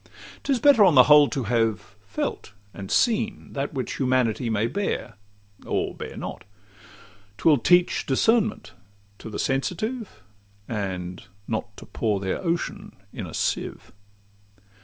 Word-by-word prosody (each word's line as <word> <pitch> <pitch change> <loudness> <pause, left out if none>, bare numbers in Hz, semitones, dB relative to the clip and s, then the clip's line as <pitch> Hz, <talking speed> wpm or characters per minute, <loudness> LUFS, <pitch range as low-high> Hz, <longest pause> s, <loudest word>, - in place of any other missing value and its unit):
'Tis 275 -2 +1
better 275 -4 +6
on 180 -6 +5
the 130 - +9
whole 150 +1 +7
to 135 -4 -2
have 110 -3 -1
felt 100 - -4 0.2
and 95 -1 -8
seen 220 -3 0
That 140 0 -3
which 130 -3 -3
humanity 125 -3 +1
may 110 0 +1
bear, 130 - -2 0.5
or - - -2
bear - - -8
not: - - -6 0.9
'Twill 150 -5 +4
teach 175 +6 +3
discernment 220 - +1 0.5
to - - -8
the 105 - -6
sensitive, 180 - -2 0.4
And 90 -4 -4 0.2
not 105 -2 -4
to - - -10
pour 105 -3 -1
their 95 -1 -2
ocean 170 -1 -3 0.2
in - - -6
a - - -10
sieve. - - -3
130 Hz, 135 wpm, -25 LUFS, 110-180 Hz, 0.9 s, the